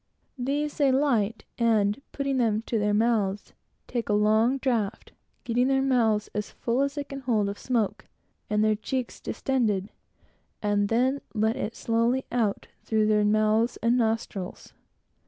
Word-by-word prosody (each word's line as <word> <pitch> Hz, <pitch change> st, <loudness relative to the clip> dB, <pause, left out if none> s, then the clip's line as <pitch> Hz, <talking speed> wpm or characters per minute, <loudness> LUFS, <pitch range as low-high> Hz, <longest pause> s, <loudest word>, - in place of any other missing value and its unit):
These, 285 Hz, +4 st, -1 dB
they 280 Hz, -3 st, +4 dB
light, 240 Hz, -6 st, +1 dB, 0.2 s
and 215 Hz, -1 st, +2 dB
putting 275 Hz, -1 st, -1 dB
them 225 Hz, -3 st, +1 dB
to 230 Hz, -1 st, -1 dB
their 210 Hz, 0 st, +1 dB
mouths, 210 Hz, -2 st, 0 dB, 0.3 s
take 235 Hz, -3 st, -3 dB
a -, -, +3 dB
long 215 Hz, +5 st, +3 dB
draught, 235 Hz, -7 st, -2 dB, 0.3 s
getting 245 Hz, +2 st, +1 dB
their 270 Hz, 0 st, +2 dB
mouths 225 Hz, -5 st, +2 dB
as 210 Hz, -1 st, -3 dB
full 240 Hz, +3 st, -1 dB
as 280 Hz, 0 st, 0 dB
they 290 Hz, -, -2 dB
can 275 Hz, -1 st, -8 dB
hold, 215 Hz, -6 st, 0 dB, 0.9 s
and 210 Hz, 0 st, +2 dB
their 215 Hz, 0 st, +3 dB
cheeks 250 Hz, +3 st, -4 dB
distended, 215 Hz, -7 st, -1 dB, 0.7 s
and 205 Hz, -1 st, +1 dB
then 260 Hz, +4 st, +1 dB
let 220 Hz, +2 st, +1 dB
it 225 Hz, -, -4 dB
slowly 235 Hz, +3 st, +1 dB
out 225 Hz, -5 st, 0 dB, 0.2 s
through 220 Hz, -1 st, +1 dB
their 210 Hz, -1 st, +3 dB
mouths 215 Hz, +2 st, +2 dB
and 235 Hz, +1 st, +3 dB
nostrils. 225 Hz, -5 st, -2 dB
225 Hz, 145 wpm, -26 LUFS, 210-255 Hz, 0.9 s, they